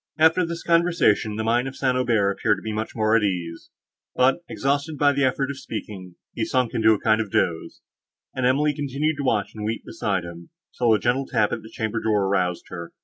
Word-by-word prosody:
After 160 +3 +4
this 170 0 -5
conversation, 170 -11 +2
the 110 - -2
mind 120 +3 +1
of 135 - -7
St. 130 -2 0
Aubert 115 -6 +2
appeared 100 +1 +1
to - - -11
be 110 - -4
much 110 +1 -4
more 110 -1 +2
at 115 - +4
ease; 90 -5 -3 0.5
but, 130 +5 +3
exhausted 140 +3 -1
by 145 0 +4
the 140 0 0
effort 135 +1 0
of 140 - -8
speaking, 95 -7 -7 0.2
he 115 - -2
sunk 125 0 0
into 110 -1 +4
a 105 - -2
kind 110 0 +2
of 110 - -5
doze, 85 -3 -1 0.5
and 130 - -3
Emily 145 +4 +2
continued 145 +2 -2
to 145 - -3
watch 105 -6 0
and 110 - -7
weep 110 +2 -3
beside 90 - -2
him, 85 0 -10 0.3
till 120 -2 +2
a - - 0
gentle 125 +5 0
tap 105 -1 +1
at - - -3
the 110 - -12
chamber 110 -1 -3
door 105 -3 +1
roused 90 -3 0
her. 85 -2 -8
115 Hz, 220 wpm, -23 LUFS, 105-135 Hz, 0.5 s, After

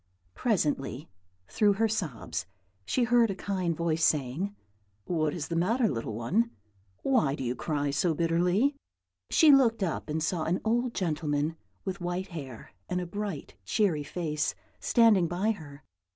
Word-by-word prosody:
Presently, 145 - -1 0.4
through 205 -2 +3
her 225 +3 +2
sobs, 175 - -3 0.4
she 255 - +2
heard 235 -1 +4
a 195 - -2
kind 185 -4 -2
voice 165 -1 0
saying, 155 +9 +1 0.5
"What 155 -3 0
is 160 -2 -4
the 170 - -3
matter, 225 +8 +2
little 115 - -3
one? 185 - +1 0.5
Why 225 - +2
do 135 - -5
you 120 0 0
cry 145 +1 -1
so 160 +3 +1
bitterly?" 175 - +2 0.5
She 315 -2 +6
looked 235 -6 +5
up 165 -3 -2
and 155 +1 -1
saw 160 0 -1
an 175 +3 +1
old 240 +2 +1
gentleman 155 -3 -1 0.3
with 190 0 -4
white 180 +2 -3
hair 135 -9 -8 0.2
and 180 - 0
a 180 - -3
bright, 195 - -5
cheery 165 - +1
face, 150 0 -2 0.2
standing 220 -7 +4
by 185 +6 0
her. 145 -8 -9
175 Hz, 150 wpm, -29 LUFS, 150-210 Hz, 0.5 s, She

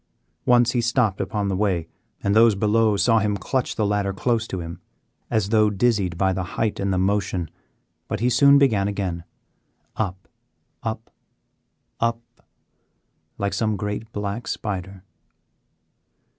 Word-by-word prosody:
Once 120 -1 +5
he 120 - +1
stopped 110 -4 +1
upon 105 +1 -2
the 95 - 0
way, 95 -5 0 0.4
and 100 +1 +1
those 115 -1 +6
below 105 +1 +2
saw 115 +3 +4
him 105 -1 0
clutch 130 +5 -2
the 110 - 0
ladder 100 -1 0
close 115 +2 0
to 95 - -4
him 85 0 -7 0.5
as 105 -3 0
though 110 -1 +4
dizzied 100 -4 +1
by 95 0 +2
the 95 - -2 0.2
height 110 -2 0
and 100 0 0
the 95 - +1
motion 95 -3 0 0.6
but - - -3
he 120 - +1
soon 140 +3 +6
began 110 -9 +3
again, 95 -4 -3 0.7
up, 95 -3 -3 0.5
up, 110 0 -5 0.9
up 115 0 +1 1.2
like 100 0 -1
some 110 +1 0
great 105 +3 -4
black 105 +3 -4
spider. 95 -2 -4
105 Hz, 145 wpm, -23 LUFS, 95-115 Hz, 1.2 s, those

